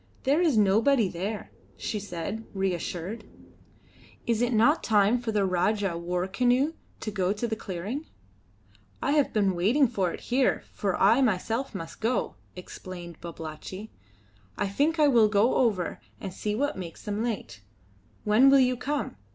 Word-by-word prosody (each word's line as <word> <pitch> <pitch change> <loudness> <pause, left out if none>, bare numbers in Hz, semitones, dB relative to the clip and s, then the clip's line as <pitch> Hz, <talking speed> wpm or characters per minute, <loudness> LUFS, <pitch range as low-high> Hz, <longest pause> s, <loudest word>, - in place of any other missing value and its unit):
"There 285 +6 +3
is 315 -9 +3
nobody 215 +4 +4
there," 200 +5 -5 0.3
she 210 - -3
said, 200 +3 -5
reassured. 185 +2 -3 1.0
"Is 230 -1 +1
it 245 0 +1
not 240 +8 +4
time 210 +2 +3
for 235 -2 -3
the 205 -2 +2
Rajah 190 +1 +1
war 175 +1 -2
canoe 250 +9 +2 0.3
to 215 - -3
go 190 -2 0
to 215 +3 -3
the 225 - -2
clearing?" 215 - -5 0.9
"I 280 - 0
have 295 -1 +3
been 200 -3 +2
waiting 235 +11 +3
for 190 -5 -1
it - - -8
here, 255 +1 +1
for 195 -3 -1
I 225 +7 +5
myself 225 +2 0
must 165 -3 -7
go," 230 +3 0 0.2
explained 180 -2 -9
Babalatchi. 170 +5 -8 0.7
"I 200 - 0
think 290 +11 +1
I 300 -1 +5
will 230 -6 +5
go 210 +3 +3
over 205 -8 0 0.2
and 190 -2 -6
see 210 +2 -2
what 285 -3 -1
makes 170 -3 -8
them 210 +1 -2
late. 220 - -4 0.6
When 220 +6 +5
will 275 - +7
you 255 -1 +3
come? 285 - -3
215 Hz, 160 wpm, -27 LUFS, 185-245 Hz, 1.0 s, will